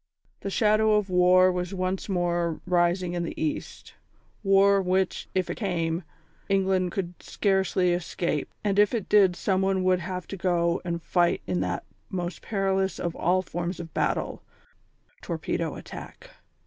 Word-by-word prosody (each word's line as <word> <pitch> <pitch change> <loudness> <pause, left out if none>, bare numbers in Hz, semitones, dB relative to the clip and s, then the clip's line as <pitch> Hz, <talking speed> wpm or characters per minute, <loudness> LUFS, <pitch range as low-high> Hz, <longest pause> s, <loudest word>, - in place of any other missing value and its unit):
The 200 - -4
shadow 215 +1 +3
of 205 -2 0
war 180 +1 +5
was 180 +1 -3
once 185 +2 -2
more 175 -3 0
rising 175 0 +1
in 175 - -1
the 170 - -5
East 155 -1 -4 0.5
war 195 0 +5
which, 185 0 0
if 185 -1 +1
it - - -4
came, 170 -5 -1 0.5
England 190 -2 +2
could 180 -2 -4
scarcely 190 -2 +1
escape, 170 -3 -2
and 205 -1 +1
if 210 +3 +4
it 220 - -3
did 195 -4 +5
Someone 190 0 +1
would 185 -1 +3
have 180 +1 -5
to 195 - -5
go 170 -2 +1
and 170 -1 -3
fight 175 -1 +1
in 90 -2 -1
that 90 -1 -2 0.3
most 180 -1 -4
perilous 195 -2 0
of 170 -1 -3
all 185 +2 +1
forms 175 +1 -4
of 165 -1 -8
battle, - - -1 0.8
torpedo - - -3
attack. - - -10
185 Hz, 150 wpm, -26 LUFS, 175-195 Hz, 0.8 s, war